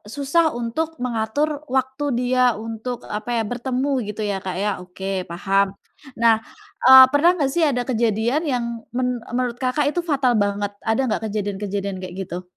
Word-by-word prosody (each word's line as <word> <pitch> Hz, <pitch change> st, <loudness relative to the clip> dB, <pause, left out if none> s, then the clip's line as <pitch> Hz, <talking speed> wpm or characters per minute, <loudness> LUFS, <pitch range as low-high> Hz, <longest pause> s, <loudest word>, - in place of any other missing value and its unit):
susah 305 Hz, +3 st, +2 dB
untuk 315 Hz, +8 st, -3 dB
mengatur 250 Hz, +6 st, -1 dB
waktu 265 Hz, +2 st, -1 dB, 0.2 s
dia 250 Hz, 0 st, +1 dB, 0.2 s
untuk, 225 Hz, +2 st, -5 dB
apa 210 Hz, +2 st, -5 dB
ya 225 Hz, -, +1 dB
bertemu 255 Hz, +3 st, -2 dB, 0.2 s
gitu 210 Hz, +1 st, -5 dB
ya, -, -, -1 dB
Kak, 185 Hz, -1 st, -4 dB
ya. 210 Hz, -, +1 dB
Oke 190 Hz, +1 st, -4 dB
paham. 195 Hz, +3 st, +1 dB, 0.5 s
Nah, 230 Hz, -1 st, +6 dB, 0.5 s
eee, 260 Hz, +1 st, +11 dB
pernah 290 Hz, +4 st, +5 dB
nggak 275 Hz, -2 st, +1 dB
sih 345 Hz, -, +2 dB
ada 270 Hz, -5 st, +2 dB
kejadian 235 Hz, +3 st, +1 dB
yang 250 Hz, -6 st, -1 dB, 0.3 s
men 250 Hz, +1 st, 0 dB, 0.2 s
menurut, 245 Hz, -1 st, -1 dB
Kakak, 275 Hz, +3 st, +1 dB
itu 350 Hz, +4 st, 0 dB
fatal 275 Hz, -6 st, +1 dB
banget? 205 Hz, 0 st, -2 dB
Ada 225 Hz, +4 st, 0 dB
nggak 225 Hz, -, -1 dB
kejadian-kejadian 200 Hz, -1 st, -3 dB
kayak 180 Hz, -1 st, -7 dB
gitu? 180 Hz, +2 st, -6 dB
240 Hz, 160 wpm, -22 LUFS, 205-270 Hz, 0.5 s, eee